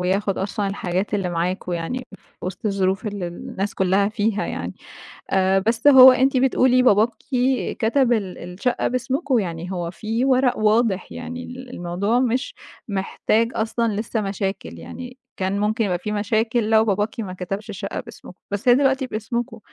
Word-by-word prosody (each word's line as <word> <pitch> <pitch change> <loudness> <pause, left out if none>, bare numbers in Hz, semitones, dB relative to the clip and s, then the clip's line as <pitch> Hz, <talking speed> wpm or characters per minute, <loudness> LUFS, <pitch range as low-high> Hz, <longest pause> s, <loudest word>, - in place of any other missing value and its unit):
وياخد 195 +2 0
أصلًا 200 +1 -2
الحاجات 195 +1 -2
اللي 195 -3 0
معاكم 175 +2 -2
يعني 210 +10 -3
في - - -16
وسط 185 +4 -5
الظروف 195 +1 0
اللي 200 -4 -3
الناس 195 +4 -5
كُلّها 195 +2 +2
فيها 210 0 -1
يعني، - - -5 0.6
آآ 190 0 +3
بس 225 +6 0
هو 260 -2 +10
أنتِ 260 +1 +2
بتقولي 255 -1 +4
باباكِ 220 -1 +5 0.7
كتب 245 +2 +3
ال 200 -5 -2
الشقة 180 +8 -2
باسمكم، 260 +1 0
يعني 175 -2 -4
هو 175 -2 -3
في 225 +7 -2
ورق 255 -1 +3
واضح، 215 -2 +2
يعني 245 0 -6
ال 255 +1 -9
الموضوع 200 +3 -1
مش 255 0 -1 0.3
محتاج 215 +3 0
أصلًا 225 0 0
لسه 215 +2 -2
مشاكل، 195 - -4
يعني 250 - -9 0.2
كان 190 +1 -1
مُمكن 215 +2 +1
يبقى 180 -3 -1
في 210 - -4
مشاكل 220 +2 0
لو 220 0 +5
باباكِ 210 +2 -1
ما 195 -5 -4
كتبش 195 +4 -5
الشقة 195 - -5
باسمكم، - - -11
بس 200 +4 -3
هي 245 - +8
دلوقتي 270 0 +2
باسمكم. 230 0 -4
215 Hz, 160 wpm, -22 LUFS, 190-245 Hz, 0.7 s, هو